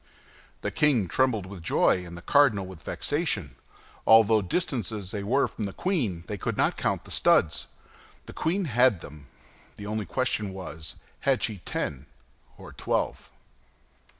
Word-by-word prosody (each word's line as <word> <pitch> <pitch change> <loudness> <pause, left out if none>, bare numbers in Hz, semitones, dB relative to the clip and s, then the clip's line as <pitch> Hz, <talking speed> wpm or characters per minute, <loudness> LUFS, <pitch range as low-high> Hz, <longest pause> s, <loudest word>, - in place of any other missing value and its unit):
The - - -2
king 130 -10 +3
trembled 115 -1 +1
with 95 -2 -9
joy 90 +2 +2
and 85 -1 -9
the 85 - -11
cardinal 130 -10 +4
with 95 -4 -10
vexation; 125 - -2 0.5
although, 110 -1 +7
distant 120 - -1
as 100 -4 -5
they 105 - -3
were 115 +8 +2
from 105 - -5
the 100 - -5
queen, 120 - -1
they 105 +1 -5
could - - -2
not - - +2
count - - -1
the - - -10
studs. 80 - +3 0.6
The - - -10
queen 180 +4 0
had 125 - +3
them. 75 -2 -11 0.5
The 105 - -8
only 105 0 -3
question 110 -6 -1
was, 85 -4 -7 0.2
had 135 -2 +1
she 105 -4 -1
ten 70 0 -3 0.5
or - - -11
twelve? - - -2
105 Hz, 155 wpm, -27 LUFS, 90-130 Hz, 0.6 s, although